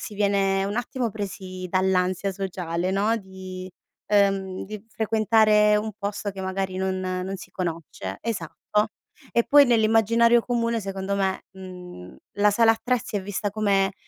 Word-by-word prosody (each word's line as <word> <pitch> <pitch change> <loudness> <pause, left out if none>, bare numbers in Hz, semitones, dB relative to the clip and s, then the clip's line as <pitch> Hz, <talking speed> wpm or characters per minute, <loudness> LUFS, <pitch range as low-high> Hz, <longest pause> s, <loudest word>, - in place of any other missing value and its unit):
si 210 - -7
viene 195 -1 +2
un 200 +2 -3
attimo 245 0 -2
presi 190 -3 -6
dall'ansia 185 0 +1
sociale, 180 -2 -3
no, 205 +4 +2
di 185 -2 -8 0.4
ehm, 195 -2 +2
di 210 0 -8
frequentare 215 -1 +3
un 215 +1 -2
posto 205 0 -3
che 195 -1 -8
magari 190 0 -2
non 190 0 -1
non 185 +1 -3
si 185 - -12
conosce 165 - -5
esatto, 210 +1 -1 0.4
e 235 - +3
poi 285 -1 +7
nell'immaginario 230 +1 +4
comune 235 -1 0
secondo 195 0 -3
me, 190 -1 0
mhmm, 180 - -10 0.2
la 210 0 +5
sala 225 +2 +5
attrezzi 230 -2 -2
è 195 - -2
vista 205 +1 -3
come 200 -2 +1
195 Hz, 145 wpm, -25 LUFS, 185-215 Hz, 0.4 s, poi